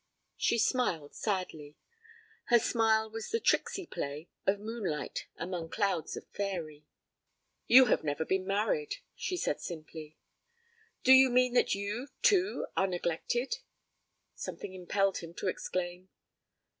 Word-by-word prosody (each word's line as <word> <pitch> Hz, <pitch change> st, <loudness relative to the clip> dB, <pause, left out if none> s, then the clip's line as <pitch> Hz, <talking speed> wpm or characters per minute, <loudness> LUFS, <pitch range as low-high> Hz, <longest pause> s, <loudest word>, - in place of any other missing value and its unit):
She 235 Hz, -, +1 dB
smiled 215 Hz, -, +1 dB
sadly. 170 Hz, -8 st, -3 dB, 0.7 s
Her 240 Hz, -, +6 dB
smile 220 Hz, -2 st, +2 dB
was 225 Hz, 0 st, -5 dB
the 455 Hz, -, 0 dB
tricksy 390 Hz, -3 st, +1 dB
play 150 Hz, -, -5 dB, 0.2 s
of 200 Hz, +1 st, +3 dB
moonlight 205 Hz, -9 st, -4 dB
among 170 Hz, -1 st, -4 dB
clouds 195 Hz, -4 st, -1 dB
of -, -, -9 dB
faëry. 165 Hz, -7 st, -4 dB, 0.8 s
'You 260 Hz, +2 st, +9 dB
have -, -, +2 dB
never 150 Hz, +1 st, -1 dB
been 190 Hz, +1 st, 0 dB
married,' 410 Hz, -, 0 dB, 0.2 s
she 365 Hz, -, -3 dB
said -, -, -1 dB
simply. 155 Hz, -2 st, -8 dB, 0.9 s
'Do 260 Hz, -, +6 dB
you 265 Hz, 0 st, +8 dB
mean 250 Hz, 0 st, +3 dB
that 250 Hz, -, +3 dB
you, 205 Hz, +6 st, -3 dB, 0.2 s
too, 395 Hz, +1 st, +3 dB
are 190 Hz, -, +3 dB
neglected?' 190 Hz, -, -1 dB, 0.7 s
something 185 Hz, -, -6 dB
impelled 195 Hz, +1 st, 0 dB
him 165 Hz, 0 st, -10 dB
to -, -, -3 dB
exclaim. 180 Hz, 0 st, -3 dB
195 Hz, 130 wpm, -31 LUFS, 170-240 Hz, 0.9 s, You